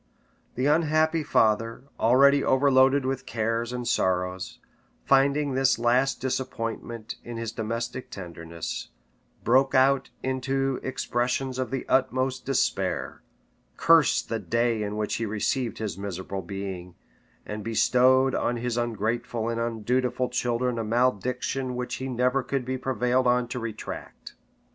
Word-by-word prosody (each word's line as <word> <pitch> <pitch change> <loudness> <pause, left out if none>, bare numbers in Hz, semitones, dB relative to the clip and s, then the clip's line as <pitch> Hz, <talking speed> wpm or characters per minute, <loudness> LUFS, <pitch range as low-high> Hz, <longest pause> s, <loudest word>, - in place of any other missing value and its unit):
The 130 - -1
unhappy 155 +1 +3
father, 115 -4 +1 0.2
already 140 +4 +5
overloaded 135 0 +4
with 130 0 -3
cares 115 +1 -1
and 125 -1 -4
sorrows, 90 0 -1 0.5
finding 140 +1 +3
this 135 0 +3
last 125 +4 +2
disappointment 115 -3 -4
in 120 -1 -7
his 115 -1 -3
domestic 115 +3 -4
tenderness, 85 -3 -6 0.5
broke 135 +4 +3
out 135 +1 +4
into 135 0 -1
expressions 130 0 -2
of 130 - -1
the 135 0 -3
utmost 130 0 0
despair, 135 -2 -1 0.6
cursed 165 -3 +4
the 115 - -2
day 115 -1 0
in 105 0 -3
which 105 -1 -1
he 115 - -2
received 115 +3 -1
his 100 -4 -4
miserable 95 0 -5
being, 95 -1 -6 0.5
and 105 0 -5
bestowed 130 +4 +3
on 120 - 0
his 120 0 -2
ungrateful 115 0 -2
and 115 0 -2
undutiful 125 +2 0
children 125 0 -1
a - - -1
malediction 125 +3 0
which 125 0 -3
he 130 - -4
never 125 +2 +1
could 135 0 -3
be 130 +1 -2
prevailed 130 0 0
on 125 0 +2
to 125 - -4
retract. 115 -2 -7
125 Hz, 130 wpm, -26 LUFS, 115-130 Hz, 0.6 s, already